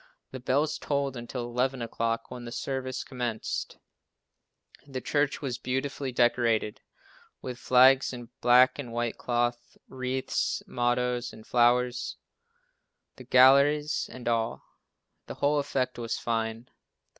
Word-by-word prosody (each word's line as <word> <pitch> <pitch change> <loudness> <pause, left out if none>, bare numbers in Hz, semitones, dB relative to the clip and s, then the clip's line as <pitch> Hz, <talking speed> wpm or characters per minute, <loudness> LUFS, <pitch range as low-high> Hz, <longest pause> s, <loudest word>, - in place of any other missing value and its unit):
The 130 - -6
bells 135 +5 0
tolled 140 -2 -1
until 120 +1 -5
eleven 125 +2 -1
o'clock, 115 0 -2
when 125 -1 -7
the 120 - -7
services 130 +1 -3
commenced. 120 -4 -4 1.1
The 135 -2 -5
church 145 +4 0
was 125 -4 -3
beautifully 135 +1 -3
decorated 120 -3 +1 0.6
with 125 -1 -7
flags 130 +1 +5
and 120 -2 -8
black 125 +3 +5
and 125 -5 -6
white 120 0 -2
cloth, 120 0 -2
wreaths, 130 0 -2
mottoes 120 0 -1
and 110 - -14
flowers, 125 +1 +2 1.0
the 130 - -10
galleries 140 +4 +4
and 125 -2 -8
all. 115 -1 -1 0.6
The - - -7
whole 145 +1 +2
effect 130 -3 -2
was 115 -1 -2
fine. 115 0 -3
125 Hz, 120 wpm, -28 LUFS, 120-130 Hz, 1.1 s, flags